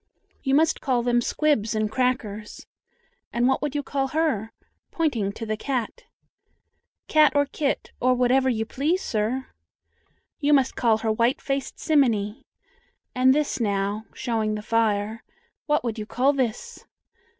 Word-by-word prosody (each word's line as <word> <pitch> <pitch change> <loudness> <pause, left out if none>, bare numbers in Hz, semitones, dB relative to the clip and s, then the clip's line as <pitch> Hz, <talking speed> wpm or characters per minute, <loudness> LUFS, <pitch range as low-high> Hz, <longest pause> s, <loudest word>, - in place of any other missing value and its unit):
"You 270 -1 +1
must 320 +2 +2
call 250 -4 +1
them 240 0 +2
'squibs 240 -6 +1
and 215 -1 0
crackers,' 225 -5 -2 0.7
And 240 +1 +1
what 265 - +1
would 295 -1 -3
you 290 - -1
call 275 -1 -1
her?" 270 -8 -1 0.4
pointing 240 -12 0
to 225 - -6
the 215 0 -1
cat. 260 - -3 1.0
"Cat 305 -1 +5
or 285 0 +4
kit, 280 0 -2
or 255 0 +3
whatever 255 +2 +3
you 225 -3 -1
please, 300 +10 -1
sir." 230 +5 -1 0.9
"You 295 -1 +2
must 270 -2 +3
call 225 -3 +3
her 220 0 -1
'white 235 +6 +1
faced 275 -1 -3
simminy.' 240 -5 +1 0.7
And 255 +1 +4
this, 300 -2 0
now," 205 0 -1
showing 220 -3 -1
the 210 - -6
fire, 220 -1 0 0.4
"what 295 -2 +2
would 230 -2 -3
you 210 - -5
call 265 +5 +2
this?" 275 - -3
250 Hz, 150 wpm, -24 LUFS, 220-280 Hz, 1.0 s, Cat